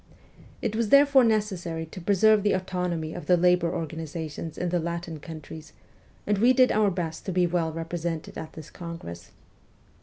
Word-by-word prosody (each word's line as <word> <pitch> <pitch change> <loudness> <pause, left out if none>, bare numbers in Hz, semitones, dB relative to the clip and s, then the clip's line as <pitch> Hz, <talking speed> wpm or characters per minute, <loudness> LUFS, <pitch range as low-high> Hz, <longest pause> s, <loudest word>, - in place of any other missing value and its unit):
It 215 - -1
was 225 -1 0
therefore 280 0 +6
necessary 190 -7 0
to 170 +3 -10
preserve 205 +3 +4
the 205 0 +2
autonomy 180 -4 -2
of 175 - -8
the 180 - +5
labour 175 -1 +3
organizations 160 -1 -5
in 180 - -1
the 175 0 +1
Latin 170 -1 -4
countries, 155 0 -10 0.5
and 205 -1 +1
we 245 +4 +5
did 255 -1 +5
our 210 -1 +3
best 170 -3 -4
to - - 0
be 180 0 +2
well 170 -2 0
represented 165 0 -4
at 160 - -7
this 160 -2 -10
congress. 130 - -8
175 Hz, 170 wpm, -26 LUFS, 160-195 Hz, 0.5 s, therefore